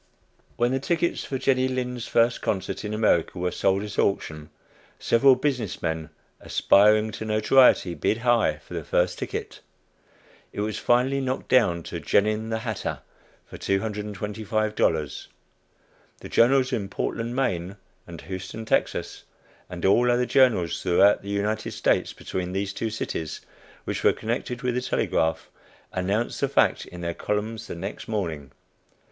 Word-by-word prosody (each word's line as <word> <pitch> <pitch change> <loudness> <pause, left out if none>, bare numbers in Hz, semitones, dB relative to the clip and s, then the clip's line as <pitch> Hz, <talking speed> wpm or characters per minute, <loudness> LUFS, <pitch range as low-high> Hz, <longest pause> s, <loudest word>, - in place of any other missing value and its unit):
When 120 +1 +2
the 135 - 0
tickets 170 +4 0
for 135 - -3
Jenny 130 0 +2
Lind's 125 -2 -3
first 115 +1 +2
concert 95 -1 -2
in 105 - -4
America 105 -5 +1
were 90 0 -1
sold 95 +2 +1
at 105 -1 -5
auction, 75 -6 -1 0.5
several 130 +3 +4
business 125 -6 -2
men, 80 -1 -3 0.3
aspiring 105 +2 +4
to 100 - -6
notoriety, 110 -2 +4
"bid 85 +7 0
high" 120 -10 +2
for - - -11
the - - -4
first - - 0
ticket. - - -5 0.9
It - - -4
was 105 0 -2
finally 130 +3 +2
knocked 130 0 -3
down 90 -10 +3
to - - -6
"Genin, 110 +2 +1
the 110 - -1
hatter," 110 -3 -4 0.4
for - - -11
$225. 105 -3 -1 0.9
The - - -9
journals 130 +2 +3
in 100 -4 -2
Portland 115 +3 -3
(Maine) 95 -8 -1 0.3
and 85 -2 -9
Houston 95 +7 -7
(Texas,) - - -1 0.4
and 90 -1 -5
all 120 +6 +4
other 120 +1 +2
journals 110 - +3
throughout 95 +3 +4
the 100 - -9
United 105 +2 -2
States, - - +1
between 90 -1 -5
these 95 0 -2
two 115 - -2
cities, 80 -7 -4 0.4
which - - -4
were - - +5
connected 120 +2 -4
with 125 -1 0
the 125 - -1
telegraph, 80 -9 -1 0.4
announced 100 +5 -1
the - - +1
fact - - +2
in 90 - -10
their 85 0 -2
columns 110 +3 -3
the - - -6
next 95 +4 -6
morning. 80 -11 -3
110 Hz, 150 wpm, -25 LUFS, 95-120 Hz, 0.9 s, were